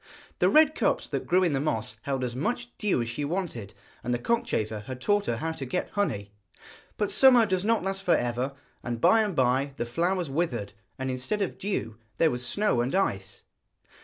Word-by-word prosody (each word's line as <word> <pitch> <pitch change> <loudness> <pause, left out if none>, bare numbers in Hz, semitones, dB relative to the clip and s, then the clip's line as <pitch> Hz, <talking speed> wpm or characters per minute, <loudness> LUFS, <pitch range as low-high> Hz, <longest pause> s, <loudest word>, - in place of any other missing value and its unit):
The - - +4
red 310 0 +6
cups - - 0
that - - -3
grew 185 +1 +4
in 170 -5 +2
the 135 - +1
moss 110 -7 -2
held 135 0 -2
as 120 -1 -3
much 240 - -3
dew 200 - +1
as - - -6
she 130 +5 -3
wanted, 145 - -4 0.3
and 120 - -2
the 120 - +2
cockchafer 110 - -1
had 130 -1 -6
taught 205 +8 +1
her 115 - 0
how 160 +7 -2
to 160 - -6
get 135 +8 -3
honey. 100 - -2 0.7
But 210 - 0
summer 250 -4 +6
does 185 -3 0
not 225 -1 +2
last 195 0 -2
for 180 - +3
ever, 120 +3 -2 0.3
and 120 -2 -4
by 225 - +5
and 205 -5 -1
by 130 +2 +1
the 120 - -2
flowers 175 +7 0
withered, 130 -10 -2 0.2
and 130 0 -2
instead 130 +12 -1
of 190 - -5
dew 115 - -3 0.2
there 165 - +4
was 125 0 -3
snow 130 - +1
and 125 +8 -1
ice. 100 - -1
140 Hz, 205 wpm, -27 LUFS, 120-195 Hz, 0.7 s, red